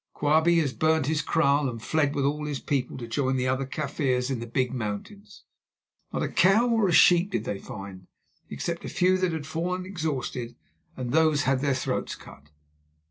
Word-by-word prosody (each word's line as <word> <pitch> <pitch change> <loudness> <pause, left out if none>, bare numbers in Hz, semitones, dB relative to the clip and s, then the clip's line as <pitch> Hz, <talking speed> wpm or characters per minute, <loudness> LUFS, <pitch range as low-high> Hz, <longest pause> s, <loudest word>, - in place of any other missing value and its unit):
Quabie 160 +3 +3
has 145 -6 +1
burnt 155 +3 +2
his 155 +2 0
kraal 145 -3 +2
and 115 -2 -6
fled 145 +5 0
with 140 - 0
all 150 +1 -1
his 145 -3 -3
people 140 -4 -2
to 120 -2 -7
join 130 +3 0
the 130 0 0
other 130 +1 -1
Kaffirs 135 -3 -1
in 130 - -2
the 120 - -6
Big 125 +1 -1
Mountains. 130 - -6 0.7
Not - - -2
a - - 0
cow 215 +6 +4
or 225 -4 +2
a - - +1
sheep 175 +2 +5
did 115 - -2
they 100 -3 -4
find, 95 -6 -9 0.4
except 170 0 -4
a - - -5
few 185 +1 +2
that 185 -2 +1
had 160 -3 -4
fallen 175 +4 -3
exhausted, 140 -9 -4 0.4
and 125 -2 -4
those 155 -1 +3
had 135 -1 +1
their 140 -2 +1
throats 130 - -2
cut. 70 +2 -15
145 Hz, 190 wpm, -26 LUFS, 125-165 Hz, 0.7 s, sheep